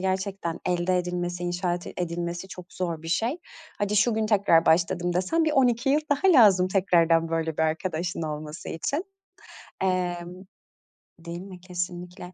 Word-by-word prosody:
gerçekten 190 -2 -2
elde 180 +1 +1
edilmesi, 175 0 -3
inşaat 175 -1 -2
edilmesi 175 +1 -4
çok 180 0 -11
zor 170 -3 -3
bir 165 - -7
şey. 230 - 0 0.4
"Hadi 205 +1 0
şu 220 +3 +3
gün 220 0 0
tekrar 200 -6 +4
başladım." 175 +1 +2
desen 255 - +1
bir 310 - +1
12 250 -2 +2
yıl 295 +2 +3
daha 320 +6 +4
lazım 185 -3 +5
tekrardan 170 -4 +3
böyle 165 -1 -2
bir 160 - +1
arkadaşın 165 +2 -2
olması 155 0 -6
için. 285 - -2 0.8
Emm 180 -1 -1 0.9
Değil 170 +1 -7
mi, 185 -2 -11
kesinlikle. 180 0 -6
180 Hz, 145 wpm, -26 LUFS, 170-195 Hz, 0.9 s, lazım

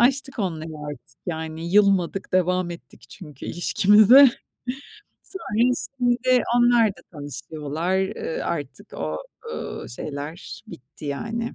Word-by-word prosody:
aştık 270 +2 +2
onları 165 -6 -2 0.2
artık. 125 -4 -15
Yani, 160 0 -4
yılmadık, 195 -2 +3
devam 180 -1 +2
ettik 170 - -11
çünkü 150 -8 -10
ilişkimize. 210 +9 +7 0.9
Sonra, 250 - 0 0.3
şimdi 250 0 +3 0.2
onlar 240 -2 +5
da - - -14
tanışıyorlar. 155 +4 -3
Eee, 190 -3 -2
artık 145 -5 -4
o, 80 -1 -3 0.4
ııı, - - -6
şeyler 145 - -7
bitti, 140 - -12
yani, 225 +11 -3
180 Hz, 110 wpm, -24 LUFS, 155-230 Hz, 0.9 s, ilişkimize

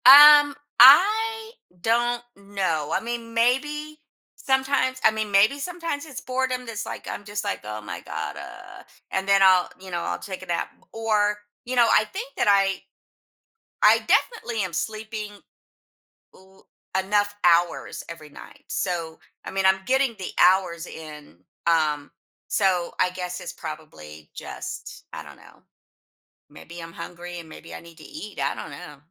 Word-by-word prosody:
Um, 290 +1 +10 0.2
I 440 - +6 0.3
don't 240 +4 +1
know, 190 -7 -2
I - - +1
mean, 230 0 -6
maybe 295 +6 0 0.4
sometimes 265 -1 0
I 220 - +7
mean, 215 -1 -3
maybe 210 +8 +4
sometimes 335 -2 -4
it's 270 -4 -8
boredom 255 -1 -2
that's 230 -2 -5
like - - -7
I'm - - -6
just 205 0 -4
like 200 - -2
"Oh 105 0 -6
my 105 - -7
God, - - -5
uh" - - -11 0.3
and 190 0 -2
then 195 0 +4
I'll 185 -2 +5
you 190 0 -11
know, 175 - -2
I'll - - -2
take 190 -2 -7
a 185 - -10
nap. 170 -1 -2 0.2
Or, 210 -2 +1 0.3
you 255 +1 -3
know, 240 -2 +5
I 215 - +4
think 465 - -7
that - - +1
I 195 -1 +3 1.0
I - - +7
definitely 240 - +1
am 185 - -5
sleeping 215 +4 -4 1.0
l 190 +1 -21 0.3
enough 205 +2 +1
hours 175 0 +2
every 160 -2 -10
night. 145 - -14
So, 165 -3 -3 0.3
I - - -6
mean, 195 0 -1
I'm 190 0 +4
getting 265 -1 +1
the 185 - -5
hours 180 -2 +3
in, 150 - -11 0.3
um, 155 -3 +1 0.4
so 185 -4 +1
I 180 - +3
guess 180 -1 -5
it's - - -6
probably 80 - -10
just, - - -8
I 80 - -6
don't 75 -1 -13
know. - - -19 0.9
Maybe 170 0 -11
I'm 165 0 -9
hungry 175 +1 -8
and 165 - -13
maybe 160 +1 -11
I - - -7
need 170 0 -16
to 155 - -13
eat. 215 - -9
I 140 +1 0
don't - - -8
know. 145 +1 -10
200 Hz, 160 wpm, -24 LUFS, 170-250 Hz, 1.0 s, Um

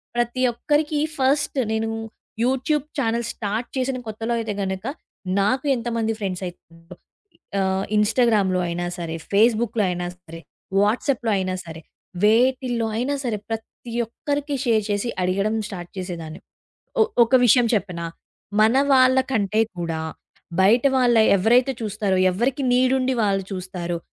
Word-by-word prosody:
ప్రతి 240 +1 0
ఒక్కరికి 295 +4 0 0.2
ఫస్ట్ 275 +2 +1
నేను 220 0 0 0.6
యూట్యూబ్ 265 +3 +1
ఛానెల్స్ 235 -3 0
స్టార్ట్ 215 +3 -3
చేసిన 260 0 -1
కొత్తలో 225 +2 -3
అయితే 220 -2 -3
గనుక, 190 0 -3 0.6
నాకు 255 +8 +1
ఎంతమంది 230 -2 -1
ఫ్రెండ్స్ 190 -3 -3
అయతారో 165 0 -13 0.6
ఆహ్, 190 0 0
ఇన్‌స్టాగ్రామ్‌లో 210 -4 +3
అయినా 175 +1 -3
సరే, 165 -1 -4 0.2
ఫేస్‌బుక్‌లో 220 +1 +3
అయినా 175 0 -3
సరే, 165 -2 -12 0.4
వాట్సాప్‌లో 230 +3 +1
అయినా 185 -1 -1
సరే, 160 -1 -9 0.4
వేటిల్లో 240 +1 +3
అయినా 270 +4 0
సరే, 225 -4 -1
ప్రతి 225 +1 -7
ఒక్కరికి 285 +4 -3
షేర్ 220 -3 +3
చేసి 205 +3 -1
అడిగడం 195 +4 0
స్టార్ట్ 175 -4 -8
చేసేదాన్ని. 170 -3 -6 0.6
ఒ - - +8 0.2
ఒక 245 +3 -1
విషయం 245 +1 +5
చెప్పనా! 180 -5 -2 0.5
మన 220 +4 +5 0.2
వాళ్ళ 260 0 +5
కంటే 215 -1 +1 0.2
కూడా, 165 -2 -2 0.6
బయట 230 +7 +4
వాళ్ళ 245 -2 +4 0.2
ఎవరైతే 245 +7 +3
చూస్తారో 210 -2 -1 0.2
ఎవరికి 255 +7 -1
నీడుండి 255 +1 +2
వాళ్ళు 195 -2 +1
చూస్తారో, 180 -2 -4
220 Hz, 125 wpm, -23 LUFS, 190-250 Hz, 0.6 s, ఒ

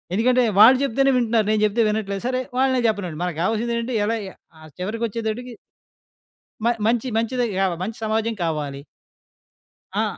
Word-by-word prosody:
ఎందుకంటే 250 +4 +3 0.2
వాళ్ళు 250 +5 +9
చెప్తేనే 275 +1 +2
వింటున్నారు. 225 -3 +1
నేను 215 -1 +1
చెప్తే 215 +3 +1
వినట్లేదు. 200 -2 -3
సరే 255 0 0 0.2
వాళ్ళనే 260 -1 +2
చెప్పనివండి. 185 -8 -2
మనకు 175 -3 -3
కావాల్సిందేంటి 235 +4 -1
ఎలా 225 +2 0 0.4
ఆ - - -16 0.2
చివరికొచ్చేతటికి 230 +4 -3 1.1
మ - - +2 0.2
మంచి 240 +2 +1
మంచిదె 240 +2 0
కావాలి, 185 -3 0
మంచి 220 +4 -5
సమాజం 220 +1 0
కావాలి. 150 -4 -3 1.2
ఆ! - - +2
225 Hz, 135 wpm, -22 LUFS, 200-240 Hz, 1.2 s, వాళ్ళు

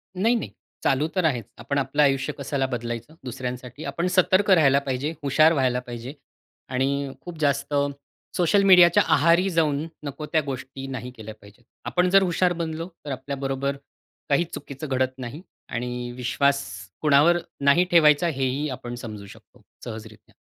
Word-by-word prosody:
नाही, 225 +6 +2
नाही. 225 - -3 0.3
चालू 140 +3 +2
तर 185 - +1
आहेच. 125 -9 0
आपण 140 - -3
आपलं 140 +2 +1
आयुष्य 135 +1 +1
कशाला 140 -1 -1
बदलायचं 120 +1 -5
दुसऱ्यांसाठी? 125 +2 -6
आपण 170 +2 -2
सतर्क 185 +2 +3
राहायला 140 -6 +5
पाहिजे, 135 +4 -2
हुशार 155 +4 +4
व्हायला 130 -4 +1
पाहिजे. 125 +1 -8 0.6
आणि 135 +1 -1
खूप 175 -2 -9
जास्त 140 -1 0 0.6
सोशल 190 +3 +3
मीडियाच्या 180 -3 +7
आहारी 170 +6 +4
जाऊन, 155 -3 +1 0.2
नको 145 +1 -6
त्या 155 +1 +1
गोष्टी 135 0 -6
नाही 125 -1 -6
केल्या 110 -3 -10
पाहिजेत. 100 +4 -18 0.2
आपण 180 0 +1
जर 195 +1 +6
हुशार 180 0 +1
बनलो, 165 0 -4 0.2
तर 145 - -4
आपल्याबरोबर 135 +1 -3 0.5
काही 145 +4 +3
चुकीचं 145 +1 -7
घडत 130 -1 0
नाही. 130 +5 -7 0.3
आणि 125 0 -4
विश्वास 140 +3 +1 0.4
कोणावर 155 +3 +5 0.3
नाही 140 +6 +5
ठेवायचा, 155 -1 +5
हेही 135 -1 -1
आपण 120 -2 -6
समजू 110 -4 -8
शकतो, - - -17 0.2
सहजरीत्या. 110 -2 -10
140 Hz, 150 wpm, -24 LUFS, 125-160 Hz, 0.6 s, मीडियाच्या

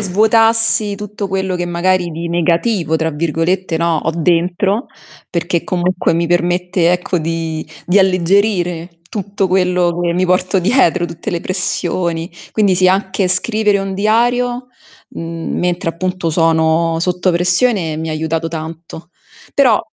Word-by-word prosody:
svuotassi 220 +1 +3
tutto 210 0 -5
quello 190 -1 -1
che 175 - -3
magari 175 0 0
di 165 +2 -5
"negativo", 170 0 +1
tra 160 0 -1
virgolette, 165 +3 -1
no 170 0 +1
ho 165 - +1
dentro, 180 - +1 0.4
perché 170 -1 -2
comunque 180 -1 0
mi 170 +1 0
permette 175 0 +1
ecco 180 0 -1
di 165 -1 -3 0.2
di 180 +3 +4
alleggerire 180 -2 +1
tutto 200 -1 -2
quello 180 -2 +1
che 175 -1 0
mi 185 +1 +1
porto 185 +1 +1
dietro, 185 -4 +2
tutte 170 0 -8
le 170 - -2
pressioni, 175 -2 -2 0.2
quindi 205 -4 +2
sì, 185 0 +4
anche 190 0 0
scrivere 210 +2 +1
un 195 0 -3
diario, 240 +4 +1 0.4
mhmm, 165 0 -5
mentre 175 -1 -1
appunto 180 0 -3
sono 165 0 +2
sotto 180 +1 0
pressione 180 -1 +1
mi 160 0 -4
ha - - -2
aiutato 160 +1 -2
tanto. 165 +1 -8 0.4
Però 250 -6 +4
180 Hz, 140 wpm, -16 LUFS, 165-195 Hz, 0.4 s, di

